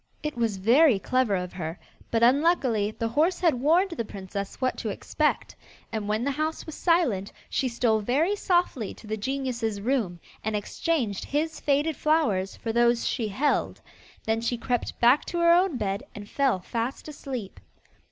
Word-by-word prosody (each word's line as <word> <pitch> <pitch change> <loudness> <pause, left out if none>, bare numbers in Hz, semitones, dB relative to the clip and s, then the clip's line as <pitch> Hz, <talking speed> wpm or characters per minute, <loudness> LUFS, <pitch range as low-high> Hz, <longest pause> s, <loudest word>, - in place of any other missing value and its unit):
It 300 -2 -3
was 230 -4 0
very 240 +6 +5
clever 255 0 +1
of 180 -1 -4
her, 165 -1 -5 0.3
but 230 0 +1
unluckily 255 -5 +3
the 225 +1 -3
horse 310 +10 +2
had 340 -3 +3
warned 345 +7 +3
the 335 - -3
princess 200 -1 -6
what 255 -1 0
to - - -3
expect, - - -1 0.4
and 215 -2 -3
when 215 +2 0
the 280 - 0
house 310 +3 -2
was 315 - -7
silent, 295 - +1 0.2
she 265 - +1
stole 235 -2 +1
very 285 - +1
softly 350 - 0
to - - -15
the 215 0 -2
genius's 235 -2 -2
room, 210 -6 -1 0.2
and 220 0 -1
exchanged 215 - -1
his 310 +2 -2
faded 290 +2 +1
flowers 255 -12 +1
for 225 - -4
those 235 0 +3
she 230 -5 -1
held. 265 +9 0 0.4
Then 225 0 0
she 235 +1 -1
crept 245 0 -2
back 245 +5 +5
to 345 - -4
her 340 0 +5
own 355 -5 +3
bed 200 -3 -2
and 205 -1 -8
fell 265 -9 +1
fast 235 +9 -4
asleep. 255 - -6
240 Hz, 170 wpm, -26 LUFS, 210-300 Hz, 0.4 s, very